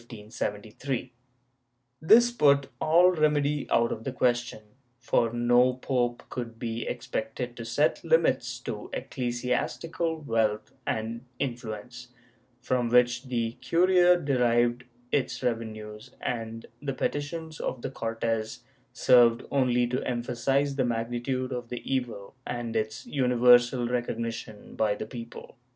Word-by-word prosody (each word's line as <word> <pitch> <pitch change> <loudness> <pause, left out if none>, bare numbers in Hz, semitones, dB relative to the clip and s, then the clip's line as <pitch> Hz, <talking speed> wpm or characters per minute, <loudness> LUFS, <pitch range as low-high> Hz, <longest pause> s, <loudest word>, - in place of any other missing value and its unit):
* 110 -2 -5 1.5
This 235 +9 +6
put 140 - +3
all 170 +3 +5
remedy 150 -3 +1
out 115 0 +3
of 110 - -4
the 135 - -3
question, 120 -3 0 0.4
for 115 -1 +1
no 120 +1 +3
pope 125 -2 -1
could 115 -2 -5
be 115 -1 -4
expected 120 0 -4
to 115 - -7
set 135 +6 +1
limits 485 - +2
to - - -6
ecclesiastical 135 +7 -2
wealth 110 -5 0
and 115 +2 -3
influence, 120 -1 -5 0.5
from 125 -1 0
which 125 +1 +3
the 120 -3 -1
curia 180 +1 +4
derived 120 -4 +2 0.3
its 140 - -1
revenues; 110 -1 -4
and 115 -1 -4 0.2
the 140 -2 -2
petitions 155 +3 -3
of 125 - -4
the - - -3
Cortes 115 -1 -3 0.3
served 120 -2 +5
only 125 -3 +2
to 125 +2 -2
emphasize 130 +3 0
the 130 - +2
magnitude 120 +2 -2
of 120 -2 -5
the 125 - -6
evil 120 -6 -3
and 120 -1 -4
its 110 0 -2
universal 125 -2 +4
recognition 115 -3 -4
by 105 -2 +1
the 105 - -5
people. 115 +3 -9
120 Hz, 120 wpm, -27 LUFS, 115-135 Hz, 1.5 s, This